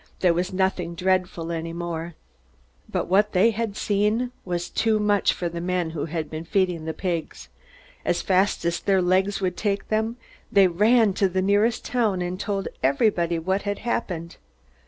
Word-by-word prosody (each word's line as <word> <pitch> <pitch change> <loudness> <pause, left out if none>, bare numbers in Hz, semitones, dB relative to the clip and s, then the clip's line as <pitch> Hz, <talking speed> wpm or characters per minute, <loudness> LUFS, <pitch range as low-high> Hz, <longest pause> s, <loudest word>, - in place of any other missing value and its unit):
There 180 -2 +4
was 180 +2 -1
nothing 185 -2 -1
dreadful 180 -2 0
any 165 0 -4
more. 170 -1 -5 0.7
But - - -1
what 205 +3 +3
they 205 +5 +5
had 220 -1 -3
seen 210 +4 +1
was 175 -1 -3
too 220 -1 +2
much 205 -2 +2
for 175 - -3
the 170 0 -5
men 180 -2 -1
who 160 -3 -3
had 160 -1 -3
been 155 +1 -6
feeding 180 -3 0
the 160 - -3
pigs. 170 - -4 0.5
As - - 0
fast 190 -1 +2
as 170 0 0
their 195 -2 +2
legs 190 +3 +1
would 180 -1 -1
take 200 -2 -1
them 220 +2 0 0.3
they 200 -1 +6
ran 210 +4 +4
to 195 0 +2
the 185 +1 0
nearest 205 +4 +2
town 220 -7 +1
and 180 +1 -4
told 200 -2 -2
everybody 170 - +2
what 190 +4 -1
had 205 0 -2
happened. 175 -8 -3
185 Hz, 175 wpm, -24 LUFS, 170-205 Hz, 0.7 s, they